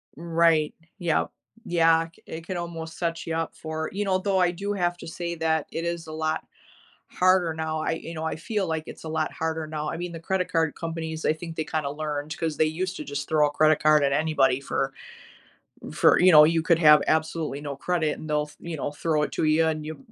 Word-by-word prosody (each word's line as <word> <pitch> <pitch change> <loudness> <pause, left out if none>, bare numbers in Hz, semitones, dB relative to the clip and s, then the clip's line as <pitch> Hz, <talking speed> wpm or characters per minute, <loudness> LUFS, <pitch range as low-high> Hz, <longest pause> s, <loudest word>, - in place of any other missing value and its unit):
Right. 165 -1 +2 0.3
Yep. 170 -4 0 0.3
Yeah, 165 -3 +4
i 165 0 -4
it 160 0 -8
could 185 0 -4
almost 165 -2 -6
set 170 -1 -2
ya 165 0 -1
up - - -11
for 160 0 -4
you 205 +1 -1
know, 190 -1 +2
though 190 0 0
I 180 -1 +3
do 200 +4 -3
have 175 -3 0
to - - -10
say 170 +1 -4
that 160 -2 0
it 165 - -3
is 170 -1 -3
a - - -7
lot 155 0 -2 0.6
harder 185 -2 +3
now, 155 0 -3
I - - -1
you 165 0 -5
know, 160 - -4
I 160 - -2
feel 205 +2 -2
like 160 -1 -2
it's - - -10
a 160 - -6
lot 160 - -1
harder 160 -1 -3
now, 155 -1 -3
I - - -4
mean, 175 +1 -4
the 165 - -7
credit 180 +2 -1
card 160 -2 +1
companies, 160 -1 -5
I - - +3
think 165 +1 -8
they 160 - -1
kinda 155 -2 -2
learned 150 0 -4
'cause 160 -3 -2
they 155 - +4
used 180 +4 -2
to - - -5
just 145 0 -5
throw 150 -1 +4
a - - -4
credit 155 +1 +3
card 155 -1 +5
at 140 0 +2
anybody 140 -4 +2
for - - -2 1.0
for, - - +5
you 180 0 +7
know, 150 -1 +10
you 165 +1 +2
could 165 0 +3
have 150 -3 +7
absolutely 160 -2 0
no 145 -2 -5
credit, 160 0 -1
and 155 - -8
they'll, 150 0 0
you 170 -1 -5
know, 140 - -2
throw 155 0 0
it - - -2
to - - -1
ya, 155 +1 +3
and 155 -1 -2
you 155 - -6
160 Hz, 235 wpm, -26 LUFS, 155-170 Hz, 1.0 s, know